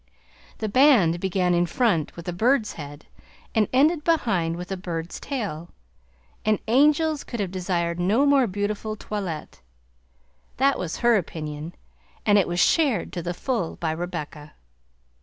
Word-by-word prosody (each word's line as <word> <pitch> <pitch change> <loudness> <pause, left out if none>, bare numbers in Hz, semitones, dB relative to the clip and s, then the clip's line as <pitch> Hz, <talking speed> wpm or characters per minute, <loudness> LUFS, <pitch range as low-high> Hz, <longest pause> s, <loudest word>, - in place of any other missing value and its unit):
The 220 - -3
band 210 - +4
began 180 -1 +1
in 175 0 +2
front 185 - 0
with 170 +1 -10
a 180 - -2
bird's 225 +4 +2
head 145 -1 -9 0.5
and 215 -3 +2
ended 295 +4 +3
behind 190 - +1
with 180 +2 -7
a - - 0
bird's 170 -2 -5
tail, 200 - -4 0.7
and 215 -1 +2
angels 295 +5 +3
could 235 - -6
have 195 -3 -2
desired 175 -2 -2
no 210 +10 +3
more 280 -3 +4
beautiful 205 +2 -3
toilette. 195 -7 -6 1.0
That 275 +2 +2
was 170 -2 -4
her 240 -2 +6
opinion, 155 -2 -5 0.5
and 205 -1 +5
it 190 - +1
was 175 0 -2
shared 275 - +2
to 175 - -3
the 175 +1 -4
full 225 -5 -2
by 165 -2 -2
Rebecca. 160 -3 -6
190 Hz, 150 wpm, -24 LUFS, 170-240 Hz, 1.0 s, her